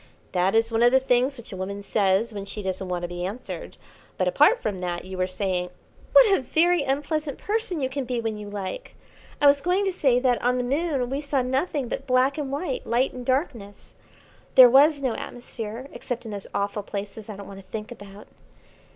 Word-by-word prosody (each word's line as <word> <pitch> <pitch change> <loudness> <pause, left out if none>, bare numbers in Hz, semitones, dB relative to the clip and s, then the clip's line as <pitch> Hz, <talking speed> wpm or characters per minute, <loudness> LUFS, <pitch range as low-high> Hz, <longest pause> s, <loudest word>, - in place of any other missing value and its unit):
"That 185 +3 +1
is 225 +1 +3
one 225 0 +1
of 240 +1 +6
the 265 - +5
things 260 +1 +1
which 235 -3 -10
a - - -5
woman 200 +2 -5
says 200 +2 +1
when 200 -1 -5
she 205 +1 -6
doesn't 190 0 -3
want 175 -1 -2
to - - -1
be 175 0 -5
answered; 205 +7 -6 0.4
but, - - +1
apart - - +4
from 200 - -3
that, 175 -1 -4
you 190 0 -7
were 185 0 0
saying 185 -1 -2 0.2
" - - -27
"What 465 -6 +7
a - - -1
very 335 +5 +2
unpleasant 285 +1 -2
person 420 -6 -2
you 260 - +1
can 265 0 -4
be 245 -1 -2
when 225 -1 -2
you 210 -1 -8
like! 205 - -6 0.4
I - - +2
was 280 0 +6
going 365 +5 +1
to 385 - 0
say 270 -8 +3
that 250 -1 +1
on 250 +1 +2
the 250 - 0
Moon 275 -1 -1
we 275 +2 -1
saw 280 -3 0
nothing 265 +1 -1
but - - -5
black 260 +3 +2
and 275 -2 -3
white, 285 -2 -3
light 245 +3 +1
and 250 - -7
darkness. 245 - -3 0.6
There 255 -2 +10
was 285 +2 +5
no 255 -3 +1
atmosphere, 235 0 -7
except 245 -2 -5
in 220 - -6
those 200 -1 -6
awful 200 +1 -2
places 205 +1 -7
I 210 - -6
don't 200 0 -9
want 195 -1 -10
to 195 - -14
think 215 +1 -5
about. 205 -2 -11
245 Hz, 220 wpm, -25 LUFS, 200-275 Hz, 0.6 s, There